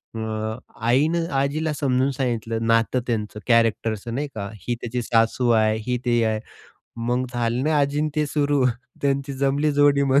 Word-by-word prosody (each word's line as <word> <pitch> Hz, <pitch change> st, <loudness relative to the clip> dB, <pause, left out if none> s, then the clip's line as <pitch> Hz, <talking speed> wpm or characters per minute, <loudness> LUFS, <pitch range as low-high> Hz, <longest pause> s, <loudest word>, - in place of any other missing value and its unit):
अ, 110 Hz, 0 st, -3 dB, 0.3 s
आईनं 160 Hz, +7 st, +2 dB
आजीला 150 Hz, +3 st, -1 dB
समजून 135 Hz, -2 st, +1 dB
सांगितलं 115 Hz, -4 st, -2 dB
नातं 115 Hz, +2 st, +3 dB
त्यांचं 105 Hz, -2 st, -2 dB
कॅरेक्टरचं 115 Hz, -1 st, +1 dB
नाही 145 Hz, +2 st, -2 dB
का, 100 Hz, -1 st, -4 dB, 0.2 s
"ही 120 Hz, -, 0 dB
त्याची 120 Hz, +1 st, -3 dB
सासू 115 Hz, +2 st, +2 dB
आहे, 110 Hz, -1 st, +3 dB
ही 125 Hz, -, +1 dB
ते 120 Hz, -1 st, +2 dB
आहे," 110 Hz, -1 st, 0 dB, 0.7 s
मग 125 Hz, +1 st, +1 dB
झाले 120 Hz, +5 st, 0 dB
आजी 145 Hz, -1 st, +1 dB
अन 155 Hz, -, +1 dB
ते 150 Hz, -1 st, +2 dB
सुरु. 145 Hz, -2 st, +1 dB, 0.4 s
त्यांची 140 Hz, 0 st, 0 dB
जमली 140 Hz, +3 st, +1 dB
जोडी 145 Hz, 0 st, +4 dB
मग 140 Hz, 0 st, +4 dB
125 Hz, 160 wpm, -23 LUFS, 115-140 Hz, 0.7 s, जोडी